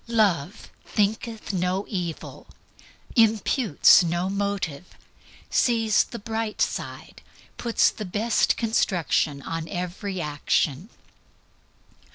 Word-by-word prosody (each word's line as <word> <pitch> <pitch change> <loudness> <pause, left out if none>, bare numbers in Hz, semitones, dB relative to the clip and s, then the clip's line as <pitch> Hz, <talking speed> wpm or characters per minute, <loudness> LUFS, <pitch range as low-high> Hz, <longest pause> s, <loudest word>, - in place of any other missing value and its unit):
Love 205 -5 0
"thinketh 215 +1 -2
no 185 +2 -1
evil," 175 -6 -5 0.7
imputes 225 - +5
no 175 +2 -1
motive, 195 -5 -3 0.6
sees 225 -3 +3
the 235 - -8
bright 225 0 -4
side, - - -3 0.4
puts 235 -2 +2
the 215 - -7
best 210 +4 +1
construction 175 - 0
on 165 0 -5
every 180 +1 -4
action. 150 - -1
200 Hz, 90 wpm, -25 LUFS, 175-220 Hz, 0.7 s, imputes